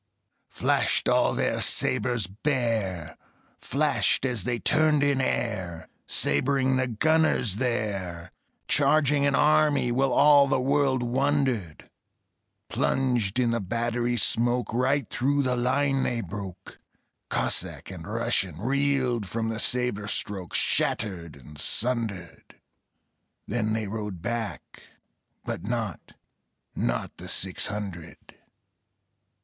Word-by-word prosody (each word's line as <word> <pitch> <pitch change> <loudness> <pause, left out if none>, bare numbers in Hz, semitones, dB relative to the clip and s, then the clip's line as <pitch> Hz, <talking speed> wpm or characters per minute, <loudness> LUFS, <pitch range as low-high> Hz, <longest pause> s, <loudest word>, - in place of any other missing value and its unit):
Flashed - - +1
all - - +3
their - - 0
sabres 120 -5 +2
bare, 110 - -2 0.4
Flashed - - +1
as 120 -7 -2
they 120 -1 -1
turned 155 +3 +2
in 140 -2 +2
air, 95 -10 -3 0.2
Sabring 130 - +1
the 130 0 +1
gunners 125 -4 +2
there, 100 -8 -3 0.4
Charging 145 0 +3
an 140 - +2
army, 150 -4 +3
while 135 +2 +1
All 145 -1 +6
the 135 - +1
world 135 -1 +1
wondered; 130 - -1 0.8
Plunged 125 -6 0
in 120 -2 +2
the 115 - 0
battery 120 +4 -1
smoke, 120 +3 +1
Right 130 +1 +1
through 140 +2 0
the 125 -1 0
line 135 +2 +1
they 120 -2 -1
broke. 95 -1 -8 0.5
Cossack - - -1
and 90 -2 -9
Russian 110 -6 0
Reeled 130 -2 0
from 110 +4 -2
the 110 0 -3
sabre 125 -5 0
stroke, 100 -4 -2
Shattered 85 -7 -1
and 70 +2 -13
sundered. 115 0 -2 0.9
Then 110 -1 -1
they 110 -1 -1
rode 105 -4 -5
back, 120 -3 -5 0.6
but - - -4
not 110 - -4 0.6
Not - - -2
the - - -10
six - - -1
hundred. 95 -6 -6
120 Hz, 110 wpm, -26 LUFS, 100-135 Hz, 0.9 s, All